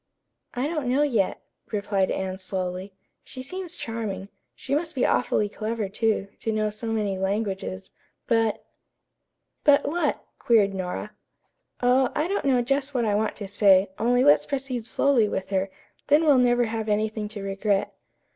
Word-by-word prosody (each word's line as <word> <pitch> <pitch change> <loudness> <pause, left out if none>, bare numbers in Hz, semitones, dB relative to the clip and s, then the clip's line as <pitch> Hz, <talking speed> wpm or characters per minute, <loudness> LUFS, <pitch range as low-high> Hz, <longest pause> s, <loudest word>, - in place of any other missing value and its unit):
"I 250 +3 0
don't 305 -5 -2
know 265 +4 +3
yet," 230 -10 0 0.3
replied 200 -2 0
Anne 190 0 -3
slowly. 185 0 -4 0.3
"She 255 - -9
seems 360 +4 -5
charming. 210 -4 -4 0.3
She 275 - -5
must 320 +2 0
be 255 - +2
awfully 210 -4 +2
clever, 215 0 -3
too, 215 -1 0
to 225 - -2
know 215 -1 0
so 215 +2 -7
many 210 -4 -1
languages, 195 -1 -2 0.3
but 225 -2 +1 0.5
" - - -54
"But 285 -1 +5
what?" 340 +4 -1
queried 210 -4 +3
Nora. 185 -2 -4 0.7
"Oh, 255 +1 +4
I 305 +3 +1
don't 395 -3 -2
know 255 -3 +3
just 275 +2 -1
what 240 -2 +1
I 210 - +1
want 215 +1 0
to 200 - -6
say, 195 -1 +4
only 245 +2 +3
let's 290 +1 +5
proceed 265 -4 -3
slowly 240 -4 +3
with 190 -1 -3
her, 195 0 0 0.4
then 300 +3 +4
we'll 285 -4 +6
never 245 -1 +4
have 220 -1 -3
anything 215 0 0
to 210 -1 -7
regret." 195 0 0
220 Hz, 165 wpm, -25 LUFS, 200-255 Hz, 0.7 s, we'll